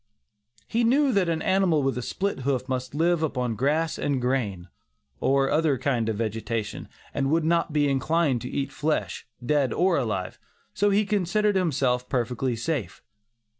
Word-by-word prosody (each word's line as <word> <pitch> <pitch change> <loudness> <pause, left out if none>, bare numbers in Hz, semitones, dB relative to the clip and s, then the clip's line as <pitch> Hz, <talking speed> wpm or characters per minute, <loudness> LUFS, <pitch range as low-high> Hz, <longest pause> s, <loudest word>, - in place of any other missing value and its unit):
He 235 - 0
knew 270 +4 +3
that 190 -4 +2
an 160 -1 -1
animal 185 -6 +2
with 135 -3 0
a 125 - -3
split 200 +10 -2
hoof 130 -1 -1
must 130 +1 -3
live 170 +1 +2
upon 125 -7 -1
grass 150 +7 0
and 140 -2 0
grain, 115 -8 -1 0.5
or 135 - +2
other 155 -3 +2
kind 120 -4 0
of 110 - -1
vegetation, 110 0 -3 0.2
and 135 -1 0
would 160 +1 +2
not 170 0 +1
be 145 -1 +2
inclined 140 -1 +1
to 125 - -5
eat 140 -1 -2
flesh, 150 +2 -2 0.2
dead 140 -3 +2
or 180 +5 +2
alive, 105 -8 -2 0.3
so 205 +2 +2
he 205 +1 +3
considered 205 +1 +1
himself 130 -8 +1
perfectly 125 0 -1
safe. 120 - -3
140 Hz, 165 wpm, -26 LUFS, 125-170 Hz, 0.5 s, knew